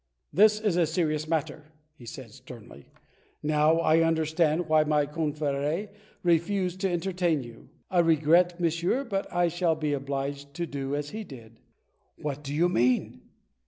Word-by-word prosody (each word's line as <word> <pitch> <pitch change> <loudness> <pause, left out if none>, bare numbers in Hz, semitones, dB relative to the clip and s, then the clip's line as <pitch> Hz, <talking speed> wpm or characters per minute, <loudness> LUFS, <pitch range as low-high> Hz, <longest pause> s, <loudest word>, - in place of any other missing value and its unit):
"This 210 +5 +5
is 210 -5 0
a 170 -2 +3
serious 155 -2 -1
matter," 155 -1 -2 0.3
he 125 -7 -15
said 125 -1 -9
sternly. 120 - -13 0.6
"Now 155 +1 +3
I 160 0 +4
understand 160 0 +1
why 155 -1 +4
my 150 -1 +1
confrhe 150 +4 -2 0.3
refused 180 +2 +1
to 195 - +1
entertain 175 -4 0
you. 120 +1 -13 0.2
I 180 - +3
regret, 170 +2 +3
monsieur, 170 - 0
but 200 -6 -3
I 175 0 +2
shall 170 -1 0
be 150 -2 -2
obliged 140 0 -4
to 175 0 -2
do 140 -2 -4
as 145 0 -4
he 220 +1 -5
did." 115 - -13 0.6
"What 145 -1 -5
do 140 - -6
you 160 +4 +2
mean?" 125 -6 +1
155 Hz, 155 wpm, -27 LUFS, 140-175 Hz, 0.6 s, This